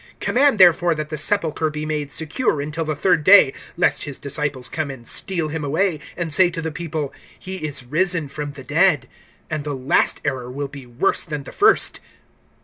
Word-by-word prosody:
(64)Command, 275 -1 +3
therefore, 175 -2 +5
that 155 0 -5
the 155 - -4
sepulchre 160 -3 0
be 150 0 -5
made 150 -2 -3
secure 160 - -1
until 150 +3 -3
the 155 -1 -2
third 155 +1 +2
day 185 -7 +7 0.2
lest 175 - +2
his 145 -3 -6
disciples 140 -3 -3
come 155 -3 -3
and 130 -4 -9
steal 170 -5 -1
him 155 0 -4
away, 160 +3 0 0.2
and 170 -3 -2
say 185 +1 +6
to 170 -1 -6
the 160 -1 -3
people: 155 -3 -4 0.2
He 190 0 -7
is 145 -6 -4
risen 165 +3 +1
from 145 +1 -6
the 135 -2 -11
dead; - - +2 0.4
and 155 -2 -3
the 145 -1 -4
last 130 +1 +1
error 125 -2 -2
will 140 +2 -4
be 140 -2 -11
worse 120 +11 +1
than 150 -3 -5
the - - -10
first. 415 - +3
155 Hz, 195 wpm, -21 LUFS, 145-170 Hz, 0.4 s, day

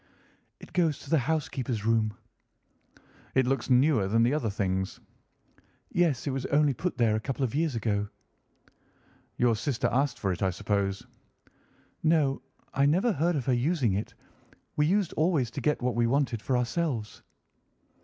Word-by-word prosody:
"It - - -14
goes 165 -5 +2
to 140 - -11
the 160 - +4
housekeeper's 130 -6 -2
room." 110 -2 +1 1.2
"It 130 -1 +4
looks 135 +2 -1
newer 125 -5 +4
than 115 +3 +3
the 120 +4 +2
other 135 -7 0
things?" 95 -2 -2 0.9
"Yes, 165 -8 +1
it 140 - -1
was 130 -1 -3
only 145 -1 +3
put 175 +8 -3
there 115 -3 +3
a - - 0
couple 135 +4 -3
of 120 - -1
years 155 -2 0
ago." 105 -2 -1 1.3
"Your 120 -2 +3
sister 120 +4 -1
asked 135 +2 +1
for 95 - -1
it, 90 - -4
I 95 - +2
suppose?" 100 +1 -2 1.0
"No, 155 -4 +2 0.3
I 140 +1 +3
never 185 +11 +3
heard 170 0 +1
of 135 -5 -2
her 130 - +2
using 125 - +1
it. 100 +3 -4 0.6
We 150 0 +2
used 195 0 +1
always 155 -7 +1
to - - -5
get 150 -4 0
what 125 0 +1
we 120 0 +2
wanted 125 -3 0
for 130 +2 0
ourselves." 125 -3 -2
130 Hz, 165 wpm, -28 LUFS, 110-150 Hz, 1.3 s, the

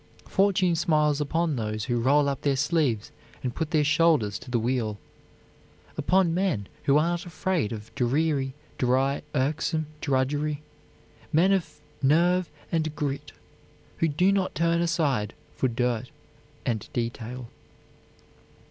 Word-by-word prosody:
Fortune 190 -3 +3
smiles 150 -3 +2
upon 160 0 0
those 110 -1 -2
who 120 -2 0
roll 140 +4 +4
up 140 -1 -2
their 140 -2 +2
sleeves 145 -6 +1 0.3
and 125 -2 -2
put 160 -2 -2
their 155 -2 +3
shoulders 150 - +3
to - - -12
the 125 - +1
wheel; 115 -2 -1 1.0
upon 180 -2 +2
men 175 - 0 0.2
who 140 +1 +5
are 160 +3 +3
not 175 0 -3
afraid 175 - -1
of 110 -1 -7
dreary, 135 +1 0 0.2
dry, 135 +2 +2
irksome 155 +3 0 0.2
drudgery, 145 +2 0 0.7
men 175 +5 +4
of 190 -3 -1 0.3
nerve 170 +6 +3 0.2
and 155 -2 0
grit 145 0 -3 0.7
who 165 - +2
do 180 +6 +3
not 195 -2 0
turn 170 +2 +2
aside 150 -11 0 0.2
for 130 - +1
dirt 125 0 -1 0.6
and 110 -3 -2
detail. 120 +1 -4
145 Hz, 130 wpm, -26 LUFS, 125-165 Hz, 1.0 s, who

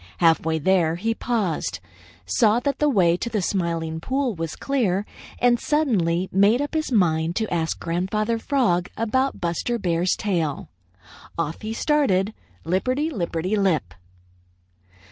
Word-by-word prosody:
Half 165 -3 +4
way 160 0 0
there, 170 0 +2
he 225 +6 -1
paused, 185 - -2 0.5
saw 210 - +3
that 280 0 -1
the 300 - +3
way 180 -9 +3
to 235 - -3
the 215 -2 -1
Smiling 165 -4 -1
Pool 260 +6 -1
was 165 -3 -4
clear, 210 -8 0 0.3
and 245 -1 +3
suddenly 190 - +1
made 200 +5 +4
up 290 +2 -3
his 310 -3 -1
mind 165 -6 +2
to 220 -3 -1
ask 165 -1 -1
Grandfather 210 +7 -1
Frog 225 - +1
about 260 +4 0
Buster 175 +8 -1
Bear's 175 -3 +1
tail. 165 - -2 0.7
Off 165 -1 -3
he 215 - -4
started, 225 -7 +1 0.3
lipperty 255 - 0
lipperty 180 - -2
lip. 160 - +1
190 Hz, 140 wpm, -23 LUFS, 165-235 Hz, 0.7 s, Half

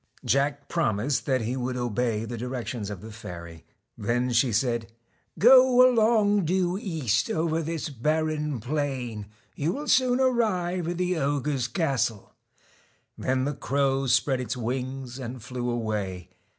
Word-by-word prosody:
Jack 140 +1 +1
promised 135 -5 0
that 130 -3 +2
he 115 +3 -2
would 125 0 -2
obey 120 -2 -1
the 120 - -5
directions 120 -3 -4
of 100 -4 -7
the 110 - -9
fairy. 85 -6 -9 0.3
Then 120 +4 -1
she 120 +1 +3
said: 115 0 0 0.2
' - - -39
Go 255 +1 +7
along 215 -5 +3
due 180 +1 +1
east 155 - -1
over 160 0 0
this 165 0 -3
barren 150 +1 -1
plain, 125 -5 -3 0.3
you 155 +4 -1
will 295 +2 -5
soon 255 -1 +3
arrive 185 -9 +1
at 175 0 -2
the 180 0 0
ogre's 140 -2 0
castle.' 120 - -1 0.8
Then 130 0 0
the 145 - -1
crow 135 -1 0
spread 130 +1 +2
its 125 +1 -4
wings 130 +1 -4
and 125 0 -6
flew 125 0 -4
away. 105 -6 -3
135 Hz, 145 wpm, -26 LUFS, 120-165 Hz, 0.8 s, Go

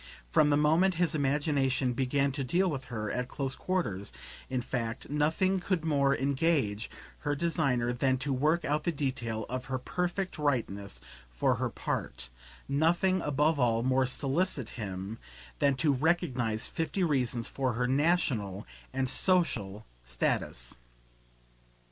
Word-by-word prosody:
From 150 - +5
the 145 - +4
moment 165 +5 +3
his 175 0 +1
imagination 140 -3 +1
began 135 +2 +1
to 135 +1 -3
deal 175 +9 +2
with 135 -3 -4
her 110 -4 -4
at 125 0 -2
close 135 0 -2
quarters, 110 - -2 0.4
in 130 -2 -1
fact, 115 0 -4
nothing 160 +6 +2
could 180 -2 -1
more 140 -3 +3
engage 135 -6 +1 0.3
her 145 -1 -1
designer 140 -7 +1
than 130 +1 +1
to 135 +2 -1
work 155 +6 +1
out 150 +1 0
the 170 - +1
detail 120 -7 -2
of 125 +1 -4
her 130 -1 -2
perfect 180 +7 -2
rightness 100 - -1 0.3
for - - +1
her - - -1
part; 60 0 -4 0.4
nothing 170 +6 +2
above 150 +1 +1
all 115 -2 +2
more 130 0 +2
solicit 140 - 0
him 100 0 -6 0.4
than 140 -1 +3
to 145 +2 +2
recognise 130 -7 +1
fifty 165 +4 -2
reasons 125 -7 0
for 130 -2 -1
her 125 +2 0
national 130 - +1 0.3
and 130 0 -1
social 115 - +1 0.2
status. - - -1
135 Hz, 140 wpm, -30 LUFS, 120-155 Hz, 0.4 s, From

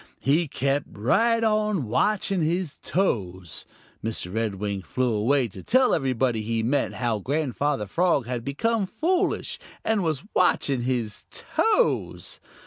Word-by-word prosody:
He 150 +7 +2
kept 140 +1 -1
right 225 - +2
on 215 - +1
watching 195 - +1
his 165 0 -1
toes. 95 - -2 0.4
Mr. 110 -5 -3
Redwing 105 -3 -2
flew 125 +4 -1
away 120 +5 +2
to 95 -1 -10
tell 255 - +3
everybody 130 -3 +1
he 115 +1 -1
met 135 +5 0
how 120 -4 -1
Grandfather 140 0 -1
Frog 165 - +1
had 120 -1 -3
become 200 - 0
foolish 355 - 0 0.3
and 220 -3 +1
was 155 -4 -1
watching 140 -7 +2
his 120 -4 -2
toes. 450 +2 0
135 Hz, 130 wpm, -25 LUFS, 115-185 Hz, 0.4 s, tell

